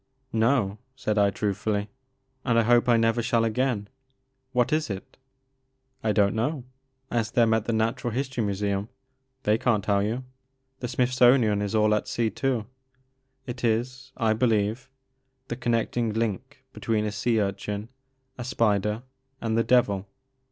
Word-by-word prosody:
No," 110 -3 +2 0.2
said 110 -5 -1
I 100 -1 +5
truthftdly, 105 +1 -1 0.3
'* 130 0 -46
and 120 -3 +2
I 115 - +5
hope 120 +2 +4
I 120 - +6
never 115 +1 +2
shall 115 -1 +2
again. 115 -2 0 0.6
What 125 +1 +1
is 155 -3 +1
it? 95 -2 -6 0.4
" 130 0 -45
''I 110 - +2
don't 100 -2 +3
know. 125 +5 -1 0.5
Ask 115 -3 -1
them 115 -2 +4
at 110 -1 +1
the 115 - -1
Natural 110 +2 0
History 130 0 -2
Museum 100 0 -1 0.3
— 130 0 -48
^they 110 +3 +2
can't 115 -6 +2
tell 100 0 +2
you. 115 +5 -2 0.6
The 125 - -3
Smithsonian 125 -3 +3
is 105 +1 -2
all 105 0 +4
at 105 - 0
sea 115 -2 0
too. 125 0 -1 0.8
It 125 -1 -6
is, 125 +3 -1
I 110 -3 +2
believe, 110 +2 0 0.6
the 120 - -2
connecting 120 -1 0
link 115 +5 -3
between 110 -2 -1
a 105 - -1
sea 110 +2 +1
urchin, 100 +1 -2 0.5
a - - -3
spider, 105 -2 +1 0.4
and 115 -1 -1
the 115 - +3
devil. 100 -6 +2
115 Hz, 160 wpm, -26 LUFS, 105-125 Hz, 0.8 s, I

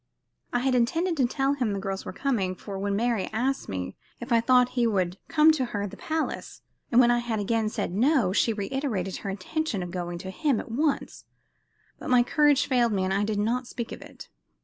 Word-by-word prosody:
I 245 - 0
had 260 0 +1
intended 330 +9 +1
to 260 -3 +3
tell 270 +2 0
him 245 -7 -1
the 200 - -2
girls 195 0 -4
were - - -5
coming, 205 -10 -1
for 195 +1 -7
when 200 0 -1
Mary 230 -2 0
asked 265 +5 -1
me 90 -1 -4 0.2
if 240 +1 -8
I 230 -1 +5
thought 250 +1 +4
he 240 -2 +1
would 185 -4 0
come 315 0 +5
to 285 -5 0
her 205 -4 -3
at 205 - -4
the - - -9
palace, 320 0 -4 0.3
and 240 - +5
when 240 -1 +6
I 240 - +3
had 235 -2 -2
again 220 +1 0
said 210 -4 -3
no, 235 -3 +3
she 225 - +3
reiterated 210 -3 -2
her 200 - -5
intention 200 - -2
of 175 - -6
going 175 -1 -4
to 190 +2 -7
him 280 +2 0
at - - -7
once; 290 +4 -1 0.7
but - - -6
my 250 -1 +5
courage 290 +2 +3
failed 240 -4 +2
me 190 -2 0
and 190 +1 0
I 200 +1 +1
did 210 0 -1
not 235 +4 0
speak 235 -1 -5
of - - -8
it. - - -12
235 Hz, 225 wpm, -26 LUFS, 200-260 Hz, 0.7 s, when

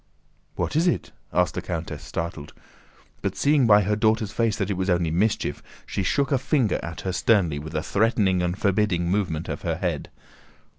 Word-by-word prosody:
"What - - -2
is 165 +3 +3
it?" 175 - 0 0.2
asked 90 0 +2
the - - -3
countess, 85 -2 -5
startled; 80 -3 -5 0.7
but - - -2
seeing 145 -3 +3
by 105 -1 +6
her 105 +2 +1
daughter's 110 -1 +1
face 115 -2 0
that 100 0 -1
it - - 0
was 95 +1 -2
only 85 -2 +2
mischief, 100 +6 0 0.2
she - - -3
shook 135 +8 +1
a 135 - +3
finger 130 - +1
at 85 +1 -6
her 95 - -2
sternly 90 -9 +2
with 80 +2 -8
a 75 - -1
threatening 100 -4 +2
and 90 +1 -1
forbidding 95 -4 +1
movement 90 -6 -1
of - - -4
her - - -1
head. - - -3
100 Hz, 190 wpm, -24 LUFS, 85-110 Hz, 0.7 s, by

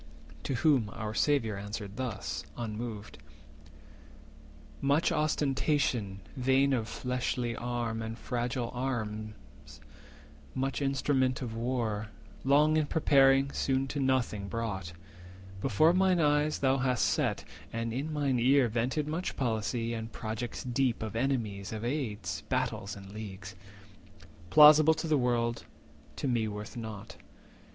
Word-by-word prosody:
To 135 - -1
whom 125 -5 +3
our 110 0 -4
Saviour 115 -6 +1
answered 105 0 -6
thus, 100 - -4
unmoved:— 110 -1 -5 1.6
"Much 145 +4 +2
ostentation 135 -9 0
vain 135 +2 +3
of 115 -4 0
fleshly 125 -1 -2
arm 120 -2 -3
And 110 0 -5
fragile 120 -1 -2
arms, 110 -4 -5 0.8
much 135 +2 -1
instrument 135 -1 +1
of 115 -2 -5
war, 115 -3 -1 0.4
Long 150 +3 +4
in 155 -2 +1
preparing, 135 -3 +4
soon 135 0 0
to 145 - -3
nothing 130 -7 0
brought, 100 -6 -4 0.7
Before 145 - +4
mine 185 -1 +3
eyes 150 0 +2
thou 135 0 +2
hast 125 -2 +2
set, - - 0 0.3
and 115 0 -3
in 140 +6 -3
my 145 -2 0
ear - - +2 0.3
390 - - -7
Vented 130 +6 0
much 165 +4 -3
policy, 115 -1 -1
and 115 0 -5
projects 110 +2 -5
deep 125 -2 0
Of 110 0 -5
enemies, 115 -6 -1
of 110 +1 -4
aids, 105 - -3
battles, 100 +1 -1
and 95 -1 -11
leagues, 100 -2 -8 0.9
Plausible 150 - +8
to 165 - -3
the 155 -3 +3
world, 120 -1 0 0.5
to - - -3
me 120 -3 +1
worth 105 0 -6
naught. 110 -3 -7
120 Hz, 130 wpm, -30 LUFS, 110-135 Hz, 1.6 s, Plausible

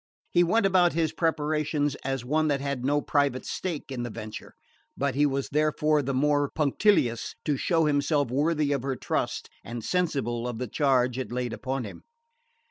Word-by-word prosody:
He 175 - +5
went 200 +5 +2
about 180 -2 +4
his 160 -1 +1
preparations 150 -2 0
as 135 -2 -2
one 155 +4 +1
that 145 -2 +1
had 140 -2 -3
no 145 +2 +1
private 140 -3 +1
stake 165 -7 -4
in 125 -2 -3
the 120 - -3
venture; 110 -1 -8 0.4
but 140 -1 0
he 145 +3 +3
was 135 -1 -2
therefore 150 0 +2
the 135 0 -2
more 145 +1 +2
punctilious 145 - +1
to 150 - +1
show 165 +3 +1
himself 145 -2 +1
worthy 150 +2 +1
of 140 -2 0
her 135 0 -2
trust - - -2 0.2
and 115 +2 -6
sensible 125 -7 -1
of 120 -2 -4
the 125 +1 -3
charge 130 -1 +2
it 130 - -4
laid 125 -1 -2
upon 130 0 -3
him. 105 - -9
140 Hz, 180 wpm, -27 LUFS, 130-155 Hz, 0.4 s, He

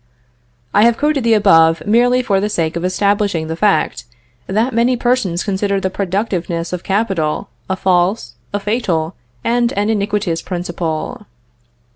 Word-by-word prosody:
I 205 - +4
have 230 +1 +4
quoted 295 -3 +1
the 230 -1 +4
above, 165 -6 +4
merely 245 +4 +3
for 195 -4 +1
the 205 +2 -1
sake 165 -5 -1
of 170 - -3
establishing 200 -2 0
the 160 +1 -4
fact, 205 +3 +1 0.4
that 220 +7 0
many 240 +2 +2
persons 235 -8 0
consider 200 0 0
the 190 -1 -2
productiveness 180 -3 -2
of 180 - -3
capital 195 -5 -1 0.2
a 190 - +1
false, 180 - +1 0.2
a 205 - -1
fatal, 195 -6 -1 0.3
and 240 0 +1
an 205 +2 0
iniquitous 200 -5 -1
principle. 175 +1 -4
200 Hz, 145 wpm, -17 LUFS, 175-220 Hz, 0.4 s, I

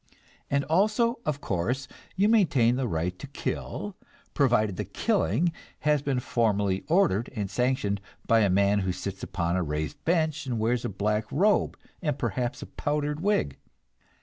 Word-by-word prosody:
And 140 0 +2
also, 215 - +2
of 145 -1 -1
course, 120 +9 -1 0.3
you 195 +2 +3
maintain 150 - +4
the 130 -1 -1
right 90 0 -2
to - - -7
kill, 190 +7 -4 0.4
provided 115 -8 +2
the - - -2
killing 165 - +1 0.3
has 150 -1 +2
been 135 -3 0
formally 105 -6 +1
ordered 155 - +2
and 100 -3 -3
sanctioned 125 -4 0 0.2
by 115 - +4
a 105 -3 +3
man 100 +2 +3
who 95 -2 -1
sits 95 +2 -5
upon 85 -2 -1
a - - +1
raised 75 -1 -3
bench 155 -4 +1
and 120 -3 -1
wears 115 +2 +1
a - - -1
black 105 +2 -1
robe, 200 +8 +2 0.2
and 150 -6 -1
perhaps 120 0 -2
a - - -6
powdered 150 0 -2
wig. 175 - 0
125 Hz, 160 wpm, -27 LUFS, 100-150 Hz, 0.4 s, maintain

